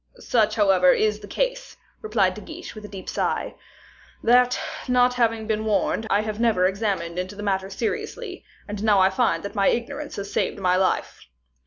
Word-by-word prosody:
"Such, 220 Hz, -, +1 dB
however, 190 Hz, -4 st, +5 dB
is 210 Hz, -1 st, +1 dB
the 205 Hz, -, -11 dB
case," -, -, -2 dB, 0.2 s
replied 210 Hz, -4 st, +1 dB
De 210 Hz, -, -9 dB
Guiche, 340 Hz, +6 st, -9 dB
with 215 Hz, -2 st, -10 dB
a -, -, -7 dB
deep 195 Hz, -2 st, -9 dB
sigh, -, -, -1 dB, 0.7 s
"that, 250 Hz, +1 st, +4 dB, 0.3 s
not 250 Hz, 0 st, +4 dB
having 230 Hz, -3 st, +1 dB
been 215 Hz, 0 st, -1 dB
warned, 220 Hz, +1 st, 0 dB
I 205 Hz, -, +3 dB
have 215 Hz, 0 st, -4 dB
never 225 Hz, -6 st, +3 dB
examined 190 Hz, -3 st, -1 dB
into 185 Hz, +3 st, -4 dB
the 205 Hz, -, -7 dB
matter 190 Hz, -1 st, -1 dB
seriously; 370 Hz, -, -4 dB, 0.2 s
and 205 Hz, -1 st, -5 dB
I -, -, -5 dB
now 200 Hz, -3 st, +5 dB
find 235 Hz, +5 st, +1 dB
that 200 Hz, -, -6 dB
my 200 Hz, -3 st, +2 dB
ignorance 280 Hz, +5 st, -2 dB
has 200 Hz, 0 st, -6 dB
saved -, -, 0 dB
my 180 Hz, -1 st, +2 dB
life." 185 Hz, 0 st, 0 dB
215 Hz, 185 wpm, -24 LUFS, 195-235 Hz, 0.7 s, however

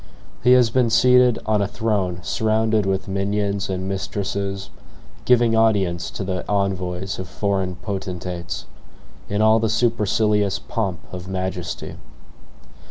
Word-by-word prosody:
He 125 Hz, 0 st, +6 dB
has 125 Hz, -3 st, +5 dB
been 125 Hz, -1 st, +2 dB
seated 125 Hz, +1 st, +5 dB
on 110 Hz, -1 st, +2 dB
a 100 Hz, -, +1 dB
throne 100 Hz, -5 st, -1 dB
surrounded 110 Hz, -1 st, +1 dB
with 95 Hz, +1 st, -1 dB
minions 100 Hz, 0 st, -1 dB
and 95 Hz, 0 st, -3 dB
mistresses, 100 Hz, 0 st, -3 dB, 0.5 s
giving 120 Hz, -2 st, +4 dB
audience 95 Hz, -6 st, +2 dB
to -, -, -5 dB
the 95 Hz, -1 st, -3 dB
envoys 95 Hz, -2 st, -1 dB
of 95 Hz, -1 st, -6 dB
foreign 95 Hz, -2 st, -1 dB
potentates, 90 Hz, -2 st, -5 dB, 0.6 s
in 105 Hz, +1 st, +1 dB
all 110 Hz, +1 st, +5 dB
the 110 Hz, 0 st, 0 dB
supercilious 105 Hz, -2 st, +1 dB
pomp 95 Hz, -7 st, -3 dB
of 90 Hz, 0 st, -6 dB
majesty. 95 Hz, -2 st, -4 dB
100 Hz, 125 wpm, -22 LUFS, 95-110 Hz, 0.6 s, He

